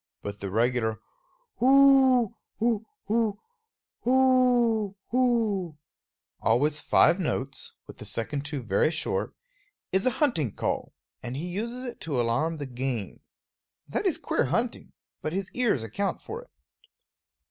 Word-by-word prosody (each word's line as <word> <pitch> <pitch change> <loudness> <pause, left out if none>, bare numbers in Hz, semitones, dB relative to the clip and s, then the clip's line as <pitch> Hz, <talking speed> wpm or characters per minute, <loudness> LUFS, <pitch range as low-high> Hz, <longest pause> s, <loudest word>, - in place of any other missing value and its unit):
But 100 0 -6
the 100 - -4
regular 115 +1 +1 0.6
whooo 265 -3 +6 0.2
hoo 225 -1 +1 0.2
hoo, 220 -1 +1 0.7
whooo 245 -5 +3 0.2
hoo, 225 -9 +1 0.6
always 145 +7 +2
five 175 - +4
notes, 140 -5 -3
with - - -13
the - - -7
second 140 +5 -2
two 145 -3 -4
very 105 +6 +2
short, 160 0 -2 0.6
is 190 +5 +2
a 255 - 0
hunting 165 - +1
call, - - -3 0.3
and 120 +1 -5
he 160 - -4
uses 230 +8 -4
it 245 - -7
to 145 -6 -2
alarm 125 +8 0
the 145 - -4
game. 125 -5 -4 0.7
That - - -1
is - - +1
queer - - 0
hunting; - - -2 0.3
but 155 - -3
his 195 +1 -3
ears 235 - +1
account 195 - -2
for 460 +3 -7
it. - - -32
185 Hz, 135 wpm, -27 LUFS, -, 0.7 s, whooo